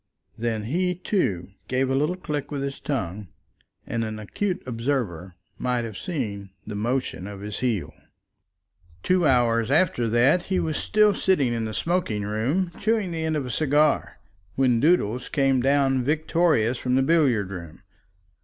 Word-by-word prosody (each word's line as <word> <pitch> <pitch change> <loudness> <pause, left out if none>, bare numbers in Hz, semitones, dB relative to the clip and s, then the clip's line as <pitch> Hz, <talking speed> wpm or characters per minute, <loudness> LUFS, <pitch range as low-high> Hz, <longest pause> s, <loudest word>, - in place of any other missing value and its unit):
Then 115 -2 -2
he, 180 +10 0
too, 135 - -1 0.2
gave 130 +1 +1
a 130 - 0
little 150 +6 +1
click 150 -6 -4
with 140 -2 -3
his 140 0 -4
tongue, 105 - -3 0.6
and 115 0 -2
an 110 -1 -4
acute 185 - -2
observer 115 - -2 0.2
might 125 -1 0
have 110 -3 -7
seen 105 - -4 0.2
the 105 - -6
motion 115 -2 -2
of 100 -1 -8
his 105 0 -5
heel. 120 -7 -1 1.1
Two 180 -3 +3
hours 115 -3 +3
after 140 -6 +2
that 130 +10 +3
he 190 -1 0
was 155 -2 -1
still 210 -1 +3
sitting 150 -11 +1
in 115 -1 -2
the 110 - -4
smoking 165 - -1
room, 125 - -1
chewing 215 -3 0
the 165 -1 -3
end 160 -1 0
of 140 - -2
a 125 - -4
cigar, 150 +2 +2 0.4
when 125 -3 +3
Doodles 125 -6 +2
came 135 -3 +2
down 135 -1 +2
victorious 150 -4 +1
from 125 0 0
the 135 - +3
billiard 130 - +2
room. 85 -4 -9
130 Hz, 160 wpm, -25 LUFS, 110-160 Hz, 1.1 s, Two